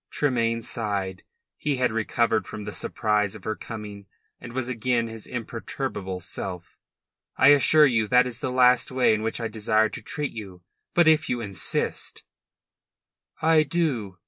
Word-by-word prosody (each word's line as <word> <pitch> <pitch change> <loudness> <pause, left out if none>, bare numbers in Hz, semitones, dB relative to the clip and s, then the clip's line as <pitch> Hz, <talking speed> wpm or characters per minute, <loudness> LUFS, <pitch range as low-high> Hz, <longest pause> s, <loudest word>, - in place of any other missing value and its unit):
Tremayne 115 -5 0
sighed. 100 -5 -3 0.4
He 145 -2 0
had 125 -2 +1
recovered 115 -1 0
from 105 - -7
the 105 - -5
surprise 105 -1 -1
of 105 - -11
her 110 - -2
coming 105 -3 -8 0.3
and 120 - -9
was 125 0 -3
again 120 -1 0
his 115 -1 -8
imperturbable 115 -5 -5
self. 90 -1 -7 0.6
"I 130 - +6
assure 145 +2 +6
you 115 -6 +2
that 125 +3 +5
is 125 -1 -5
the 130 - -2
last 125 -1 +4
way 130 -3 +3
in 110 - -1
which 115 +2 -2
I 115 - -2
desire 110 0 +1
to - - -7
treat 150 -2 -3
you. 95 -5 -9 0.3
But 175 -2 +5
if 160 0 +4
you 120 - 0
insist 100 -5 -3 0.6
" - - -37
"I 155 - +6
do." 135 - -1
115 Hz, 165 wpm, -25 LUFS, 105-125 Hz, 0.6 s, I